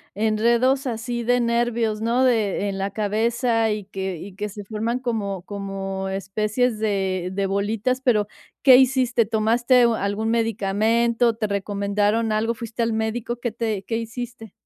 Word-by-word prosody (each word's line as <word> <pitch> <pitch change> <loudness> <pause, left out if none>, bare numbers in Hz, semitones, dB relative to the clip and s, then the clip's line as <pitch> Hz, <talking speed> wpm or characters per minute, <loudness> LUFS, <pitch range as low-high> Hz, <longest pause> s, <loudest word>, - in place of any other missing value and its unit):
enredos 235 +5 +2
así 235 +1 -3
de 245 +1 +2
nervios, 235 -2 0
¿no? 235 +3 +2
De 215 -5 +1
en 195 0 -4
la 195 +1 -1
cabeza 225 +3 0
y 210 -1 -2
que 190 -2 -4
y 195 +4 -9
que 210 +1 -4
se 205 +1 -8
forman 225 +3 -2
como 210 -7 -3
como 195 -1 -5
especies 210 +5 -1
de 190 -4 -1
de 195 +1 -1
bolitas, 210 +6 -1
pero, 215 -6 +2 0.4
¿qué 260 -2 +9
hiciste? 255 -3 +3
¿Tomaste 235 +3 +3
algún 220 -1 0
medicamento? 230 +2 +1
¿Te 220 -1 -2
recomendaron 205 +2 0
algo? 225 +2 0
¿Fuiste 230 +1 -5
al 230 -1 +1
médico? 220 +2 -2
¿Qué 240 -1 -2
te 220 -3 -2
qué 225 - -3
hiciste? 230 -1 -7
220 Hz, 150 wpm, -23 LUFS, 200-235 Hz, 0.4 s, qué